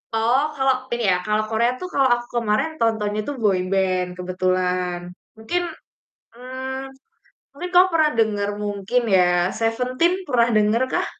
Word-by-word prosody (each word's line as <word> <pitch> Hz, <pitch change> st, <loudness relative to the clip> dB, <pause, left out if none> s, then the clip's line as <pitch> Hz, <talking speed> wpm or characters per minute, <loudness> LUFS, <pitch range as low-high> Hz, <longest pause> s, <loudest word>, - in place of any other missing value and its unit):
Oh, 235 Hz, +5 st, +2 dB, 0.2 s
kalau 265 Hz, -1 st, +3 dB, 0.2 s
Ini 240 Hz, -1 st, -2 dB
ya, 180 Hz, -, +3 dB
kalau 215 Hz, 0 st, +1 dB
Korea 235 Hz, +2 st, +2 dB
tuh -, -, -5 dB
kalau 270 Hz, -1 st, +3 dB
aku 240 Hz, 0 st, -3 dB, 0.2 s
kemarin, 215 Hz, +8 st, +1 dB
tontonnya 215 Hz, -2 st, 0 dB
tuh 290 Hz, -, -3 dB
boy 195 Hz, -4 st, +2 dB
band, 185 Hz, -2 st, +1 dB
kebetulan. 180 Hz, -1 st, -1 dB, 0.4 s
Mungkin 285 Hz, +11 st, -2 dB, 0.7 s
mmm, 260 Hz, +2 st, -6 dB, 0.7 s
mungkin 355 Hz, +6 st, -6 dB
kamu 365 Hz, +1 st, +7 dB
pernah 310 Hz, -2 st, +4 dB
denger, 205 Hz, -2 st, +1 dB
mungkin 205 Hz, +4 st, -1 dB
ya, 180 Hz, -, +5 dB, 0.3 s
Seventeen 250 Hz, +9 st, +1 dB
pernah 240 Hz, -3 st, +3 dB
denger 215 Hz, +4 st, +2 dB
kah? -, -, +1 dB
225 Hz, 145 wpm, -22 LUFS, 200-260 Hz, 0.7 s, kamu